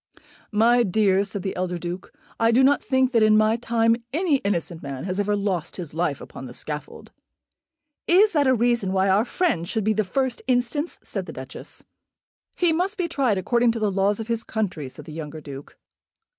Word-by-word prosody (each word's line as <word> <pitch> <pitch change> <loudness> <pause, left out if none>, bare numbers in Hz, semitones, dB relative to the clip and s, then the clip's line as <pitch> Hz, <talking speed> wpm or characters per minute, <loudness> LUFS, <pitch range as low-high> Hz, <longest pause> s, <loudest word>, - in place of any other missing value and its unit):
"My 230 +3 +4
dear," 200 -2 +2
said 200 -1 -6
the 190 - -3
elder 180 -1 -2
Duke, 175 +2 -6 0.3
"I 230 0 +4
do 245 +3 +4
not 285 +2 +4
think 260 -1 +2
that 230 -2 +3
in 215 0 +5
my 215 +1 +4
time 230 -1 +2
any 320 0 +2
innocent 175 -7 -2
man 135 -2 -6
has 185 +1 -3
ever 205 0 +1
lost 190 -5 -2
his 170 -5 -7
life 160 -4 -1
upon 130 - -9
the 125 - -10
scaffold." 150 -1 -7 1.0
"Is 400 +5 +5
that 290 -4 +2
a 260 - +4
reason 235 -5 +1
why 190 0 +2
our 200 +4 +3
friend 245 - 0
should 220 -1 -1
be 215 +2 +2
the 215 +1 +1
first 260 +5 -1
instance?" 255 +5 0
said - - -5
the - - -7
Duchess. - - -10 0.7
"He 345 -2 +2
must 370 +6 -1
be 360 -3 0
tried 260 -10 +1
according 235 +5 +2
to 230 - -4
the 210 -2 +1
laws 195 +2 +1
of 220 - -5
his 230 -1 -1
country," 180 - -3
said - - -11
the 155 - -9
younger 155 -1 -6
Duke. 140 -2 -10
215 Hz, 200 wpm, -24 LUFS, 180-245 Hz, 1.0 s, in